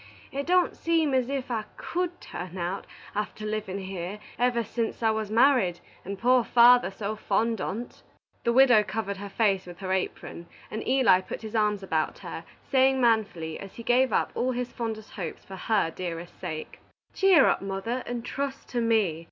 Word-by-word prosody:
It 280 +2 -4
don't 360 0 +3
seem 325 -4 +1
as 260 -1 +1
if 270 -2 -3
I 220 -2 -1
could 355 0 -3
turn 180 +1 -7
out, 180 +3 -3 0.3
after 210 +1 -4
livin' 215 -3 -3
here 190 0 -5 0.2
ever 245 -1 +2
sense 230 +1 -3
I 220 - +4
was 220 -1 -2
married, 225 -6 +4 0.2
and 200 +1 -5
poor 245 +3 +4
father 245 0 +6
so 200 +2 -4
fond 225 0 0
on't." 230 +5 -5 0.4
The 235 - +2
widow 245 -3 +6
covered 200 0 -3
her 200 +1 -7
face 195 -3 +1
with 175 -1 -9
her 185 0 -4
apron, 175 -2 -4 0.2
and 220 - -3
Eli 255 -8 +5
put 185 - -7
his 220 0 -7
arms 210 -2 +1
about 160 -4 -1
her, - - -6 0.3
saying 265 0 +4
manfully, 210 -9 +1
as 195 - -10
he 235 - -8
gave 250 +1 +3
up - - +1
all 255 +1 0
his 245 0 -3
fondest 220 -2 -5
hopes 175 -6 -6
for 195 - -9
her 195 -3 +1
dearer 170 -1 -5
sake 155 -2 -7 0.3
"Cheer 385 -3 +6
up, - - +2
mother, 195 +6 -3
and 240 -1 -4
trust 275 +1 -4
to 240 - -1
me. 225 -1 +4
220 Hz, 185 wpm, -27 LUFS, 195-250 Hz, 0.4 s, father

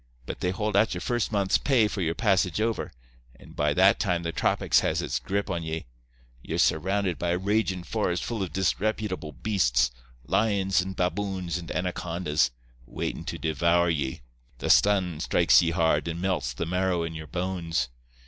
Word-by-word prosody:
But - - -6
they 90 - 0
hold 105 +2 -2
out 100 -1 +3
your 90 - -5
first 120 +3 -1
month's 100 -3 +2
pay 125 -6 +3
for 105 - -4
your 85 -1 0
passage 95 -4 +1
over, 115 +1 -1 0.4
and - - -16
by 75 0 +1
that 95 +1 +5
time 90 -4 0
the 85 - -2
tropics 80 - +2
has - - 0
its - - -2
grip 100 +2 -2
on 90 -4 -2
ye. 80 0 -4 0.6
Ye're - - -4
surrounded 95 +2 +1
by 85 - -1
a 85 - +1
ragin' 95 -1 0
forest 85 +2 -1
full 115 -3 -3
of 95 - -3
disreputable 95 -2 -1
beasts—lions 65 - 0
and 95 +1 -5
baboons 90 -1 -2
and 85 - -9
anacondas—waitin' 75 -9 -3
to - - -4
devour 85 +2 +2
ye. 70 -5 -2 0.4
The - - +1
sun 95 -6 +3
strikes 85 -3 +4
ye 85 - +1
hard, 80 -3 +1
and 85 0 -3
melts 85 -10 -1
the - - -3
marrow 90 0 0
in 80 0 -4
your 80 -1 -7
bones. 85 -6 -2
90 Hz, 170 wpm, -27 LUFS, 80-95 Hz, 0.6 s, that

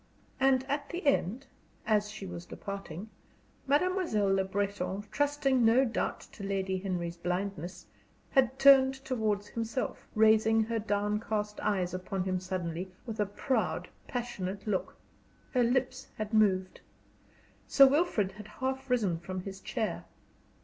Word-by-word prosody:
And 265 -1 +4
at 285 0 -2
the 350 -1 -5
end, 265 -2 +1 0.4
as 210 -1 +2
she 215 -2 -7
was 175 -1 -7
departing, 200 0 -7 0.6
Mademoiselle 290 - +2
Le 195 0 +2
Breton, 195 0 -2
trusting 285 -3 +2
no 235 +4 +5
doubt 235 - -2
to - - -13
Lady 190 -1 -1
Henry's 175 -3 -3
blindness, 180 0 -3 0.5
had 265 -1 +3
turned 270 -1 +7
towards 215 -6 0
himself, 230 +3 -3
raising 220 0 +5
her 225 +1 -1
downcast 210 0 -1
eyes 185 -4 0
upon 185 +1 -3
him 185 -1 -1
suddenly, 185 -1 -4
with 225 -2 -6
a 210 - +2
proud, 245 +6 -1 0.2
passionate 205 -6 -4
look. 205 -4 -2 0.6
Her 250 - +3
lips 255 +2 0
had 215 0 -4
moved; 190 -4 +2 0.9
Sir 275 - +8
Wilfrid 270 - +2
had 210 +1 -11
half 265 +4 -4
risen 205 -9 +1
from 185 +2 -5
his 195 +1 -7
chair. 220 +1 -3
210 Hz, 135 wpm, -31 LUFS, 190-255 Hz, 0.9 s, Sir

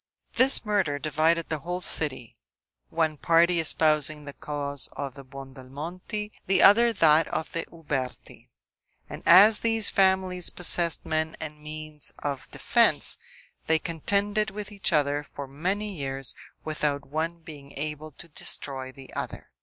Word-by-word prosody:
This 255 -1 +4
murder 195 -9 0
divided 160 +3 0
the 155 - -3
whole 175 +4 -5
city; 145 -9 +1 0.5
one 160 -2 -1
party 170 +3 +3
espousing 155 -2 +2
the 140 - -8
cause 145 -2 -2
of 140 -2 -6
the 140 - -12
Buondelmonti, 140 - -8 0.2
the 190 - +3
other 235 +4 +6
that 160 -6 +4
of 160 - -4
the 165 - -4
Uberti; 145 -6 -6 0.6
and - - -9
as 205 +5 +8
these 225 -2 +3
families 190 -2 +2
possessed 175 -1 +1
men 160 0 -2
and 150 -1 -8
means 155 -1 -5
of 140 -3 -5
defense, - - +2 0.5
they 160 - +3
contended 200 +6 0
with 205 +1 -7
each 200 -2 +2
other 145 -2 0
for 140 - -5
many 190 +9 -3
years, 135 -5 -2 0.3
without 150 -2 -2
one 165 +4 -4
being 145 -3 -12
able 150 +1 -5
to 175 - -10
destroy 135 -3 -4
the 135 0 -15
other. - - -7
155 Hz, 140 wpm, -26 LUFS, 145-180 Hz, 0.6 s, as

